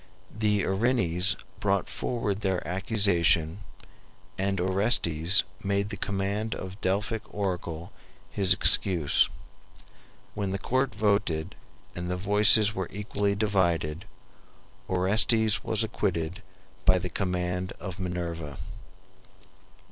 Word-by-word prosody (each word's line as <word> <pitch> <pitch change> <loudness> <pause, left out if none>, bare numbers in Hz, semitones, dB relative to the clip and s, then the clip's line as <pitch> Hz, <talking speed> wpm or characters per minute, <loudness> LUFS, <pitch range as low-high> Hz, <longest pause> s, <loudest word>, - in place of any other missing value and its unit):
The 105 -2 +1
Erinyes 95 -3 +1 0.2
brought 100 -2 0
forward 105 -4 -2
their 95 -3 -1
accusation, 90 -3 +1 0.8
and 95 0 -1
Orestes 95 -2 +3 0.2
made 100 +1 0
the 105 - -4
command 100 +2 -2
of 95 - -6
the 95 - -12
Delphic 105 +4 -1
oracle 90 -4 -4 0.4
his 95 -2 +2
excuse. 90 -3 +4 1.0
When 100 -2 -3
the 95 - -2
court 130 +4 -1
voted 100 -6 0 0.4
and 90 0 -4
the 90 - -1
voices 105 +2 +5
were 95 -3 -4
equally 100 0 -2
divided, 90 -5 0 0.8
Orestes 105 +4 +3
was 110 0 0
acquitted 90 -4 -2 0.4
by 95 0 +5
the 90 - -3
command 90 -1 -2
of 95 -1 -7
Minerva. 85 -5 -4
95 Hz, 105 wpm, -27 LUFS, 90-105 Hz, 1.0 s, voices